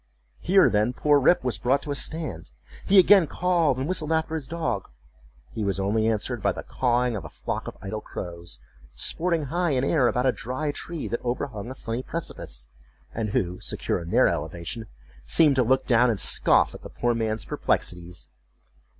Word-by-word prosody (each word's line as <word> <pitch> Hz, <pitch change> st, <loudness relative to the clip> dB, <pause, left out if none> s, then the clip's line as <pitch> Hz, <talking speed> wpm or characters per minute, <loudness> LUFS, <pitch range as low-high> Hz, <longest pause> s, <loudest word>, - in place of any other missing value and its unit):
Here, 190 Hz, +3 st, +4 dB
then, 105 Hz, +4 st, +1 dB
poor 145 Hz, +2 st, +3 dB
Rip 145 Hz, +4 st, +3 dB
was 125 Hz, -2 st, -1 dB
brought 135 Hz, +3 st, +1 dB
to 145 Hz, -, -4 dB
a -, -, -1 dB
stand. 150 Hz, -, -2 dB, 0.4 s
He 200 Hz, -, +5 dB
again 190 Hz, -2 st, +7 dB
called 170 Hz, -5 st, +1 dB
and 130 Hz, +2 st, -2 dB
whistled 165 Hz, -4 st, -1 dB
after 160 Hz, 0 st, 0 dB
his 155 Hz, -5 st, -3 dB
dog; 130 Hz, -, -3 dB, 0.6 s
he 110 Hz, -, -4 dB
was 100 Hz, -1 st, -1 dB
only 110 Hz, +3 st, +1 dB
answered 115 Hz, +1 st, -1 dB
by -, -, +1 dB
the -, -, -7 dB
cawing 125 Hz, -1 st, 0 dB
of 100 Hz, -, -5 dB
a 80 Hz, -, -8 dB
flock -, -, -5 dB
of -, -, -8 dB
idle 105 Hz, +2 st, -4 dB
crows, 85 Hz, -10 st, -7 dB, 0.4 s
sporting 170 Hz, -2 st, 0 dB
high 175 Hz, -3 st, +1 dB
in 130 Hz, -1 st, +1 dB
air 140 Hz, -3 st, +3 dB
about 125 Hz, +1 st, 0 dB
a 130 Hz, -, +4 dB
dry 130 Hz, +5 st, -3 dB
tree 165 Hz, +2 st, -6 dB
that 120 Hz, -, -4 dB
overhung 120 Hz, -3 st, -3 dB
a 130 Hz, -, -7 dB
sunny 115 Hz, -1 st, -3 dB
precipice; 130 Hz, -, -4 dB, 0.4 s
and 110 Hz, -2 st, -2 dB
who, 90 Hz, -2 st, -1 dB
secure -, -, -2 dB
in 85 Hz, -, -8 dB
their -, -, +4 dB
elevation, 85 Hz, +8 st, -4 dB, 0.4 s
seemed 155 Hz, -4 st, +5 dB
to 130 Hz, -, +4 dB
look 130 Hz, +3 st, +2 dB
down 125 Hz, 0 st, +4 dB
and 110 Hz, -4 st, 0 dB
scoff -, -, +4 dB
at -, -, -10 dB
the -, -, -10 dB
poor 120 Hz, 0 st, 0 dB
man's 110 Hz, -1 st, -1 dB
perplexities. 90 Hz, 0 st, -2 dB
125 Hz, 190 wpm, -25 LUFS, 110-155 Hz, 0.6 s, again